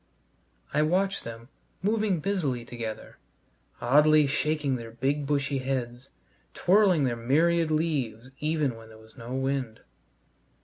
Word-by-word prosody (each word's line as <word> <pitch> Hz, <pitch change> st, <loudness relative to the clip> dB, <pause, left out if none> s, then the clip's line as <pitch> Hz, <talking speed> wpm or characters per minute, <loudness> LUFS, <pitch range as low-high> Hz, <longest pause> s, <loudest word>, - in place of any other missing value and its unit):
I 150 Hz, -, +3 dB
watched 190 Hz, +5 st, +1 dB
them 115 Hz, +1 st, -9 dB, 0.3 s
moving 210 Hz, -4 st, +1 dB
busily 150 Hz, -12 st, -1 dB
together, 115 Hz, -3 st, -7 dB, 0.6 s
oddly 150 Hz, +4 st, +5 dB
shaking 150 Hz, 0 st, 0 dB
their 115 Hz, -2 st, -6 dB
big 135 Hz, +5 st, -1 dB
bushy 140 Hz, -1 st, 0 dB
heads, 130 Hz, -1 st, -3 dB, 0.5 s
twirling 185 Hz, -5 st, +4 dB
their 125 Hz, -3 st, +1 dB
myriad 160 Hz, +8 st, +2 dB
leaves 135 Hz, -7 st, -1 dB
even 150 Hz, -4 st, 0 dB
when 115 Hz, 0 st, -13 dB
there 110 Hz, -, -14 dB
was 110 Hz, 0 st, -18 dB
no 125 Hz, 0 st, -6 dB
wind. 135 Hz, -4 st, -2 dB
140 Hz, 125 wpm, -27 LUFS, 120-155 Hz, 0.6 s, oddly